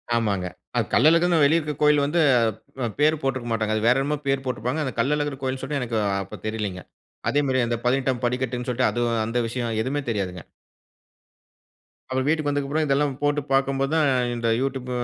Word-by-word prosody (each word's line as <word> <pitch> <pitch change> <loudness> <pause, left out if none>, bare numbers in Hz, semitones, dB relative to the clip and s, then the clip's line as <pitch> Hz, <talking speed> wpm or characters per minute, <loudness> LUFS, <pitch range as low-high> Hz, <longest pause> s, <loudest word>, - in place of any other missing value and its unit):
ஆமாங்க. 100 -6 0 0.3
அது - - +2
கள்ளழகர்னு 165 +2 +4
வெளிய 160 +4 +4
இருக்க 150 -2 -4
கோயில் 150 -1 +4
வந்து, 155 +4 0 0.7
அ - - 0
பேர் 155 +1 +3
போட்டுருக்க 130 -3 -2
மாட்டாங்க. 110 -1 0
அது 110 +1 -1
வேற 125 - +5
என்னமோ 150 +2 -1
பேர் 135 -1 +1
போட்டுருப்பாங்க. 125 +4 -2
அந்த 130 - -3
கள்ளழகர் 145 +1 0
கோயில் 130 0 -2
சொல்ட்டு 140 +1 -2
எனக்கு 115 -2 -2 0.3
அப்ப 95 - -10
தெரிலங்க. 105 -4 -3 0.5
அதே 145 - +2
மாரி 130 -1 +1
அந்த 120 0 -1
பதினெட்டாம் 130 0 +1
படிக்கட்டுன்னு 125 0 -2
சொல்லிட்டு, 125 +1 +2
அது 120 - -2 0.2
அந்த 115 +2 -2
விஷயம் 115 -1 -3
எதுவுமே 140 +4 -2
தெரியாதுங்க. 95 -5 -3 1.7
அப்புறம் 130 0 -1
வீட்டுக்கு 155 -1 +1
வந்ததுக்கப்புறம் 145 +2 0
இதெல்லாம் 140 0 +1
போட்டுப் 145 -1 0
பார்க்கும் 135 0 +1
போதான், 155 +2 +2 0.3
இந்த 120 -1 -2
யூடியூப் 135 -1 -3
130 Hz, 170 wpm, -24 LUFS, 120-145 Hz, 1.7 s, வேற